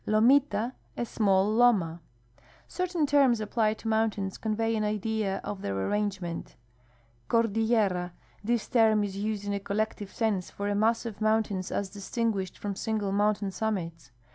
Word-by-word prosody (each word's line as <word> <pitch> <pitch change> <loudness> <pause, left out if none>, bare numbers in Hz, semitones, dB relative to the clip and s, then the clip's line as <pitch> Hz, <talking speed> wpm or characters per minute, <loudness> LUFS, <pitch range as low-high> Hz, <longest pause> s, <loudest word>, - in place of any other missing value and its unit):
Lomita. 235 +1 +3
— - - -34
A 240 - -1
small 200 -2 +2
loma. 200 -9 +3 0.7
Certain 360 -4 -1
terms 275 -5 +4
applied 215 0 0
to 225 - -8
mountains 220 -3 0
convey 225 +1 0
an 215 - 0
idea 210 -1 -1
of 200 -2 -5
their 100 -1 -2
arrangement: 190 - -2 0.7
Cordillera. 220 -5 +2 0.2
— - - -32
This 235 +1 0
term 220 -3 +4
is 195 -1 -4
used 205 0 -3
in 205 - -1
a 200 - -1
collective 205 0 -3
sense 210 -6 -1
for 200 - -4
a 205 - 0
mass 225 +3 +2
of 220 -2 -6
moun 220 +1 +3
tains 190 -3 -5
as 200 - -1
distinguished 205 -2 -2
from 200 -1 -4
single 215 -2 -2
mountain 205 0 +1
summits. 180 -5 -3
210 Hz, 160 wpm, -28 LUFS, 195-225 Hz, 0.7 s, terms